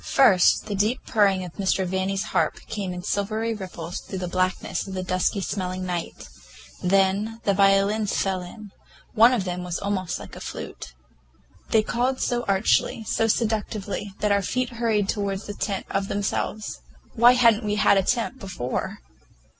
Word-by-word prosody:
First 200 -10 +4
the 210 - -4
deep 210 +5 0
purring 195 -4 +2
of 175 - -9
Mr. 190 -1 +1
Vanni's 190 +2 -1
harp - - +2
came 205 -5 -4
in 180 0 -6
silvery 215 +4 -1
ripples 180 -4 -6
through 190 - -7
the 180 -1 -3
blackness 185 +2 -1
of 190 - -6
the 185 - -2
dusty 185 +2 0
smelling 185 -1 -3
night; 175 -2 -4 0.5
then 195 +4 +1
the 200 - +2
violins 195 +2 +3
fell 190 -1 0
in—one 215 +4 0
of 240 -6 +1
them 180 -1 -4
was 175 -1 -3
almost 195 -3 -2
like - - -10
a - - -8
flute. - - -8 0.7
They 220 -1 +4
called 250 +4 0
so 240 0 0
archly, 195 +3 +2
so 225 +1 0
seductively, 210 -3 -2
that 210 - +2
our 200 0 +3
feet 250 +6 -1
hurried 230 -4 0
toward 200 -2 -1
the 205 - -7
tent 200 -1 -3
of 195 0 -1
themselves. 205 +1 -2 0.3
Why 240 +1 +7
had 235 -3 +5
n't 220 - -8
we 210 0 0
had 205 -1 +4
a - - +3
tent 240 +5 -1
before? 175 - -4
200 Hz, 170 wpm, -24 LUFS, 185-220 Hz, 0.7 s, Why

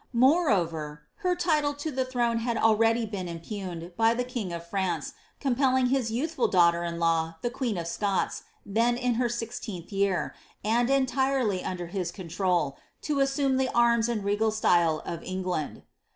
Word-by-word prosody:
Moreover, 185 - +2
her 360 -1 0
title 305 -5 +1
to 290 +2 -4
the 260 -1 0
throne 240 -2 0
had 235 0 -1
been - - -2
already 225 +1 +4
impugned, 175 -1 -6
by 225 +1 +3
the 245 - 0
king 240 -7 -4
of 170 0 -6
France 175 -4 -2 0.3
compelling 260 -1 +2
his 260 -3 +1
y»>uthful 265 +4 0
daughter 170 -2 +4
in 170 0 -3
law, 165 -1 +1
the 240 - 0
queen 245 -5 -2
of 170 - -3
Scots, 195 +3 -1 0.2
then 230 +4 +1
in 250 -1 +1
her 240 - +2
sixteenth 230 -6 -5
year, 195 -2 0 0.3
and 235 +3 +2
entirely 265 -6 +1
under 180 -1 -4
his 175 0 -3
control, 175 -4 -1 0.2
to 295 -2 0
assume 275 -1 +2
the 260 -1 +1
irm« 235 -1 +4
and 220 -4 -1
re<:nl 205 +2 +1
style 170 -7 +2
of 170 -1 -5
England. 185 -4 -3
225 Hz, 165 wpm, -27 LUFS, 175-250 Hz, 0.3 s, already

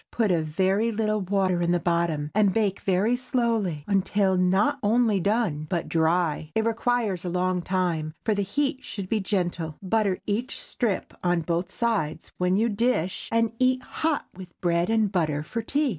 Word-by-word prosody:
Put 220 -4 +1
a 170 -2 +2
very 190 +8 +1
little 215 -1 0
water 185 -2 +1
in 170 - +1
the 175 0 +2
bottom, 170 -3 0
and 210 -2 +4
bake 205 -2 0
very 195 +5 +2
slowly 230 - -1
until 195 -1 +2
not 190 +10 +2
only 220 -1 +3
done, 195 -7 0
but 170 -2 -1
dry. 160 -1 +1
It 220 - +1
requires 230 -5 0
a 180 - -3
long 180 +1 0
time, 170 -4 -1
for 220 - +3
the 205 - 0
heat 270 +8 -1
should 195 -3 -6
be 220 - +1
gentle. 175 -5 -2
Butter 200 -1 +1
each 230 +6 -2
strip 220 -6 -2
on 175 -1 +2
both 170 +3 -2
sides 190 -11 -1
when 180 +1 +2
you 225 +3 +2
dish, 205 -5 0
and 230 -1 +2
eat 255 0 +2
hot 315 -2 -1
with 185 -1 -12
bread 170 +1 +1
and 220 -3 +2
butter 155 -6 0
for 230 +9 -4
tea. 285 +5 0
195 Hz, 175 wpm, -26 LUFS, 175-225 Hz, -, and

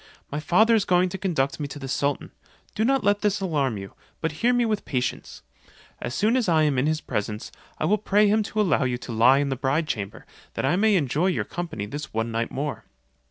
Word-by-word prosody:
My 145 - -2
father 220 +9 +4
is 220 -3 +4
going 180 -1 +2
to 190 - -6
conduct 160 -8 -1
me 145 - -2
to 140 - -8
the 135 -2 -6
sultan; 140 +2 -1 0.4
do 220 - 0
not 270 +2 +2
let 205 0 +2
this 210 -1 +1
alarm 145 - 0
you, 95 0 -8 0.3
but 160 - -1
hear 240 +2 +4
me 245 -1 +2
with 215 -3 -1
patience. 125 -2 -3 0.6
As 120 - -4
soon 220 +4 +2
as 245 -7 +1
I 160 -2 +4
am 145 -4 +2
in 135 - +1
his 155 0 0
presence, 105 +1 -4 0.3
I - - -1
will 210 +6 +2
pray 210 +1 +3
him 215 +2 +3
to 215 +1 -4
allow 185 -7 +2
you 125 -1 0
to 120 - -8
lie 120 +4 +5
in 140 0 0
the 135 - -1
bride 135 +5 0
chamber, 100 -6 -4 0.3
that - - -1
I 140 - +2
may 215 +2 +3
enjoy 155 +1 +1
your 185 - 0
company 165 -12 -5
this 145 +7 -6
one 115 +1 -1
night 115 +1 -1
more. 145 +1 -4
155 Hz, 235 wpm, -25 LUFS, 130-205 Hz, 0.6 s, lie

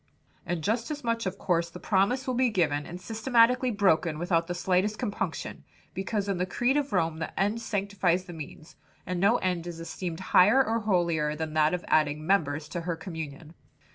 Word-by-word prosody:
"And 170 -1 -2
just 230 +5 0
as 295 -2 -5
much 230 -3 -1
of 190 +1 -4
course 170 -3 0
the 180 - -10
promise 210 +8 +1
will 255 - -1
be 250 0 +2
given 150 -8 0
and 175 - -7
systematically 235 +4 +2
broken 180 -7 +2
without 170 0 0
the 175 - -3
slightest 190 +4 +1
compunction; 205 - -4 0.3
because 200 +1 -2
in 195 -3 -1
the 180 - 0
creed 245 +8 +1
of 290 -1 0
Rome 165 -4 0
the 160 - -5
end 205 +4 +1
sanctifies 195 -4 0
the 175 - -9
means 155 0 -10 0.3
and 180 -1 -3
no 200 +6 +4
end 180 -2 -2
is 170 -1 -6
esteemed 165 0 -5
higher 225 +9 +6
or 225 +1 0
holier 170 -7 +1
than 160 0 -4
that 155 +2 +3
of 180 - -7
adding 150 0 +2
members 155 -5 +1
to 175 - -4
her 170 0 -2
communion." 160 -2 -7
180 Hz, 195 wpm, -28 LUFS, 165-215 Hz, 0.3 s, higher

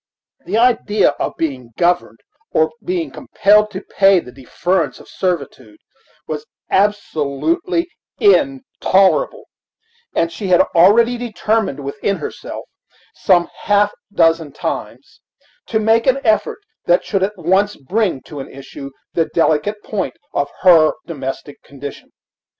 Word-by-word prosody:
The - - 0
idea 230 -4 +3
of - - -2
being 130 -7 -4
governed, 175 +1 0 0.3
or 475 - +3
of - - -2
being 355 -2 -2
compelled 210 -5 +2
to 190 -2 -7
pay 195 -1 +4
the 125 - -10
deference 155 +8 -2
of - - -15
servitude, 140 - -4 0.5
was 155 -1 -5 0.2
absolutely 210 - 0 0.3
intolerable; 275 - +2 0.7
and 165 - +1
she 180 +4 -5
had 180 -1 +5
already 230 +8 +5
determined 220 - -1
within 140 +8 -2
herself, - - -7 0.5
some 175 -3 +2
half 205 0 +2 0.2
dozen 165 -5 +2
times, - - -6 0.5
to 220 - 0
make 225 +2 +2
an 260 +1 +4
effort 220 -3 +1 0.3
that 175 +1 +3
should 195 -3 -1
at 200 +2 -1
once 190 +4 +1
bring 180 0 -1
to 150 - -9
an 135 - -7
issue 135 0 -9 0.2
the 165 - +2
delicate 165 +6 +1
point 215 +8 -3 0.2
of 145 0 0
her 165 -4 +6
domestic 140 -2 -6
condition. 140 0 -10
190 Hz, 125 wpm, -18 LUFS, 155-215 Hz, 0.7 s, her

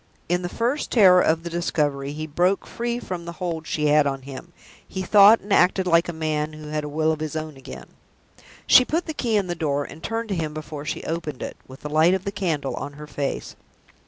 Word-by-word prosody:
In 175 +1 0
the 175 - -4
first 245 +9 -1
terror 185 -6 +6
of 165 +1 +1
the 170 - -4
discovery, 145 -5 -1
he 155 +1 -5
broke 175 +5 +1
free 235 0 -3
from 180 -7 -6
the 170 - -6
hold 165 -2 -4
she 150 - -1
had 150 0 +4
on 135 -1 -3
him: 140 +6 -9 0.4
he 190 - -4
thought 205 +3 +7
and 200 0 -2
acted 185 +1 +3
like 170 -1 +3
a - - 0
man 155 -1 -2
who 155 0 -9
had 150 0 -2
a 150 - -5
will 155 +2 +1
of 155 - -3
his 155 -1 -4
own 155 -1 -4
again. 135 - -10 0.8
She 255 - +7
put 325 +7 -1
the 315 - -4
key 235 -7 0
in 200 - +1
the 175 - -3
door, 145 -4 -1
and 160 - -11
turned 225 +2 -3
to 195 - -1
him 155 -3 -3
before 155 -1 -7
she - - -4
opened 160 -5 -4
it, - - -6
with 130 +1 -13
the - - -5
light 160 +4 +4
of 190 - -4
the 200 - -2
candle 165 -8 -2
on 145 0 -5
her 150 +1 -10
face. 145 -1 -4
160 Hz, 240 wpm, -23 LUFS, 150-185 Hz, 0.8 s, thought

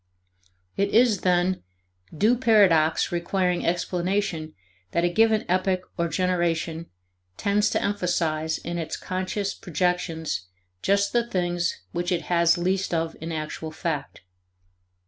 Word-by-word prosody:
It 200 0 +2
is, 230 -4 +4
then, 180 0 +2 0.6
DO 220 +8 +4
paradox 190 -10 +4
requiring 180 +1 0
explanation 175 -1 -1 0.4
that 170 - +2
a 175 - +3
given 220 +3 +3
epoch 185 0 0
or 170 -1 0
generation 170 -2 -1 0.5
tends 205 +1 +2
to - - 0
emphasize 170 -5 0
in 170 +1 -4
its 160 -1 -4
conscious 185 +2 -3
projections 175 - -2 0.3
just 200 0 +2
the 235 -1 +2
things 175 - -1
which 175 +1 -2
it 175 -2 0
has 170 -1 +3
least 185 +1 0
of 165 0 -1
in 165 +1 -4
actual 155 0 -4
fact. 155 -2 -4
175 Hz, 125 wpm, -25 LUFS, 165-195 Hz, 0.6 s, is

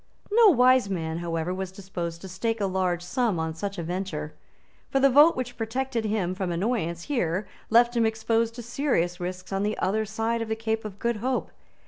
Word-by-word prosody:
No 455 +1 +7
wise 255 - +5
man, 165 -3 -2
however, 170 0 -2
was 190 0 -4
disposed 175 -3 -6
to 190 - -7
stake 225 +5 -2
a 200 - +1
large 185 -2 0
sum 215 -1 0
on 160 0 -2
such 200 +5 -5
a 170 - -3
venture. 165 -3 -4 0.6
For 270 - +2
the 275 0 +5
vote 295 +5 +7
which 250 -1 -4
protected 235 +1 -2
him 205 -4 0
from 185 -1 -3
annoyance 170 -3 -1
here 195 - -1 0.2
left 235 +2 +5
him 230 -1 +3
exposed 225 +1 0
to 240 - -7
serious 230 - 0
risks 185 +1 -5
on 195 - 0
the 210 +1 -1
other 215 +4 0
side 225 +2 -1
of 225 - -4
the 220 - 0
Cape 220 0 -2
of 205 -2 -7
Good 235 +1 -1
Hope. 255 +4 -2
210 Hz, 200 wpm, -26 LUFS, 180-235 Hz, 0.6 s, No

